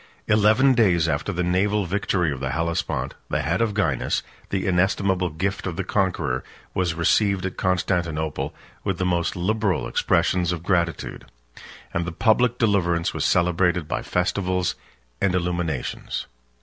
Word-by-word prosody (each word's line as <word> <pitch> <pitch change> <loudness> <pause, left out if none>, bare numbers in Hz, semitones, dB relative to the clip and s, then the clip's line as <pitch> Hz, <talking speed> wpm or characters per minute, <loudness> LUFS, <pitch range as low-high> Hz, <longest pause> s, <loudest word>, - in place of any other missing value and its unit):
Eleven 110 +6 +5
days 90 -9 +3
after 80 +5 -1
the 90 -1 -1
naval 100 +3 +1
victory 90 -3 0
of 70 - -4
the 65 0 -2
Hellespont, 85 +2 -1 0.2
the - - 0
head - - 0
of 110 -3 0
Gainas, 80 - 0 0.3
the 95 -1 -1
inestimable 95 0 +1
gift 95 +6 -2
of 85 - -3
the 95 - -2
conqueror, 85 - 0 0.3
was 90 -3 0
received 95 +3 +2
at 95 - -3
Constantinople 85 -4 -1 0.3
with 95 -3 -1
the 90 - -1
most 85 -2 0
liberal 100 +1 0
expressions 90 -1 +1
of 85 -2 -4
gratitude; 85 -4 -1 0.7
and 85 - 0
the 90 - -3
public 115 +6 +2
deliverance 90 -7 +1
was - - -2
celebrated 90 -1 +2
by - - -2
festivals 90 0 0 0.5
and 90 -2 +2
illuminations. 85 -6 -2
90 Hz, 145 wpm, -24 LUFS, 85-100 Hz, 0.7 s, Eleven